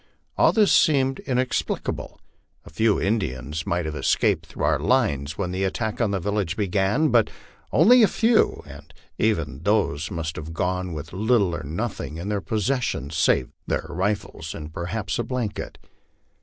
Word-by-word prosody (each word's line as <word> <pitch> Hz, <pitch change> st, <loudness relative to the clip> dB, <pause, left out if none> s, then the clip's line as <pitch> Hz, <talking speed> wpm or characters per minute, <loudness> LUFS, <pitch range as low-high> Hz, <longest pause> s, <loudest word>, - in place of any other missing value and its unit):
All -, -, +5 dB
this 215 Hz, -3 st, +4 dB
seemed 135 Hz, -4 st, +3 dB
inexplicable. 130 Hz, -1 st, -2 dB, 0.5 s
A -, -, -12 dB
few 110 Hz, +5 st, +2 dB
Indians 80 Hz, -, -2 dB
might 85 Hz, -1 st, 0 dB
have 80 Hz, -, -3 dB
escaped -, -, +1 dB
through -, -, -6 dB
our -, -, +2 dB
lines 85 Hz, -, +1 dB
when 90 Hz, -3 st, -2 dB
the 95 Hz, +1 st, -2 dB
attack 110 Hz, +4 st, -2 dB
on 115 Hz, -, +2 dB
the 100 Hz, -1 st, -1 dB
village 100 Hz, -3 st, -1 dB
began, 105 Hz, -, +1 dB
but 115 Hz, -4 st, +3 dB, 0.4 s
only 235 Hz, -, +6 dB
a 215 Hz, -, +7 dB
few, 225 Hz, +2 st, +2 dB
and -, -, -12 dB, 0.3 s
even 80 Hz, -11 st, 0 dB
these 95 Hz, -6 st, +1 dB
must 80 Hz, -1 st, -4 dB
have 80 Hz, +1 st, -7 dB
gone 90 Hz, 0 st, -1 dB
with 80 Hz, +2 st, -7 dB
little 100 Hz, -3 st, +2 dB
or -, -, -5 dB
nothing 80 Hz, -, -4 dB
in 90 Hz, +5 st, -5 dB
their 105 Hz, -1 st, -1 dB
possession 110 Hz, -, -1 dB
save 80 Hz, -6 st, +2 dB, 0.2 s
their -, -, -1 dB
rifles 95 Hz, -4 st, -3 dB
and 75 Hz, 0 st, -8 dB
perhaps 95 Hz, +7 st, -3 dB
a -, -, +1 dB
blanket. 120 Hz, -3 st, -4 dB
100 Hz, 160 wpm, -24 LUFS, 80-115 Hz, 0.5 s, a